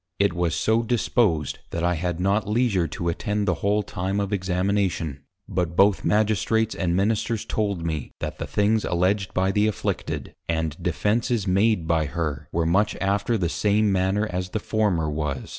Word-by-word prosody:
It 100 -2 +2
was 85 -1 0
so 110 +1 +2
disposed, 110 - +1
that 85 - -3
I 90 0 +2
had 90 +1 -2
not 100 +2 +1
leisure 105 -6 +2
to 85 - -4
attend 105 +4 -1
the 90 - +3
whole 105 +1 +2
time 95 +1 -2
of 100 0 -2
Examination, 90 -5 -1 0.3
but 85 -2 -2
both 100 +2 +4
Magistrates 110 +1 +2
and 90 -2 -1
Ministers 110 +3 0
told 100 -6 -1
me, 80 -5 -3
that - - -5
the - - -4
things 105 +1 +2
alledged 95 +2 0
by 95 +1 +2
the 105 +2 +2
afflicted, 110 - -3 0.2
and 80 -2 -1
defences 115 0 0
made 100 -2 +2
by 80 -2 +1
her, 75 -3 -3
were 85 0 0
much 95 +6 +2
after 100 +4 +1
the 90 -4 0
same 105 +4 +2
manner 95 +3 +1
as 90 -2 -3
the 110 - -2
former 100 -7 0
was. 75 -3 -3
95 Hz, 175 wpm, -24 LUFS, 85-105 Hz, 0.3 s, both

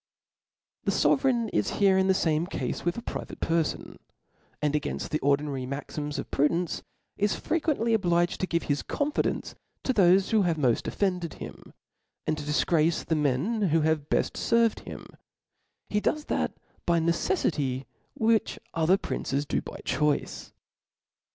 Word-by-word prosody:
The - - +2
Sovereign 240 -5 +2
is 105 - 0
here 195 -2 +5
in 190 0 +3
the 190 - +4
fame 160 -1 +1
cafe - - -2
with 175 +4 -1
a 235 - -5
private - - -6
perfon^ 165 -2 -1 0.6
and 150 0 0
againft 150 - -2
the 155 - 0
ordinary 140 -2 0
maxims 145 +2 -4
of - - -5
prudence, 165 +4 +1 0.4
is 205 0 +1
frequently 295 -8 0
obliged 175 -4 +2
to 185 - 0
give 170 -1 0
his 145 -1 0
con^ 290 +1 -2
fidence - - -1 0.3
to 260 - +1
thofe 190 -2 +4
who 220 -2 +4
have 170 -4 +1
mod' 125 -6 +1
offended 180 -4 -1
him, - - -10 0.5
and 155 - +1
to - - -5
dtfgrace 155 +2 +2
the 160 - +1
men 150 - +1
who 160 +1 +3
have 155 -1 0
beft - - 0
ferved 230 -1 +2
him: - - -7 0.9
ht 210 - +1
does 300 +6 0
that - - -1 0.3
by 170 -1 +4
necefllcy 160 - 0 0.3
which 225 0 +2 0.2
other 165 +4 +3
princes 140 -6 -2
do - - -1
by - - -8
choice. 150 -2 0
170 Hz, 155 wpm, -27 LUFS, 150-205 Hz, 0.9 s, here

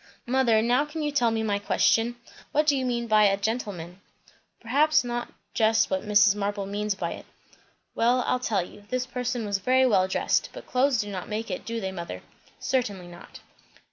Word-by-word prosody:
"Mother, 240 -3 +3
now 245 +4 +3
can 300 +1 -5
you 295 - -1
tell 245 -5 +2
me 225 0 -1
my 205 -2 0
question? 225 +3 +2 0.4
What 300 +1 +3
do 290 -2 +3
you 260 -1 -1
mean 235 -1 -1
by 215 -2 +4
a 195 -1 +3
'gentleman.'" 200 -5 -4 0.6
"Perhaps 290 +7 +3
not 240 0 -4 0.2
just 220 0 +2
what 190 - 0
Mrs. 210 -1 +5
Marble 205 -1 -2
means 205 +1 -2
by 170 -3 -3
it." - - -9 0.7
"Well, 245 +2 +2
I'll 250 - +1
tell 205 -7 0
you. 205 +3 -15
This 255 0 -1
person 250 -2 -3
was 200 -1 -1
very 260 +6 +3
well 195 -6 +3
dressed, 190 - 0
but - - -10
clothes 255 -1 +2
do 205 0 -6
not 185 -2 -6
make 220 +2 -4
it, - - -5
do 230 0 -3
they, 190 -3 -3
mother?" 170 -2 -7 0.4
"Certainly 205 -9 -2
not." 175 0 -13
225 Hz, 195 wpm, -26 LUFS, 200-250 Hz, 0.7 s, Mrs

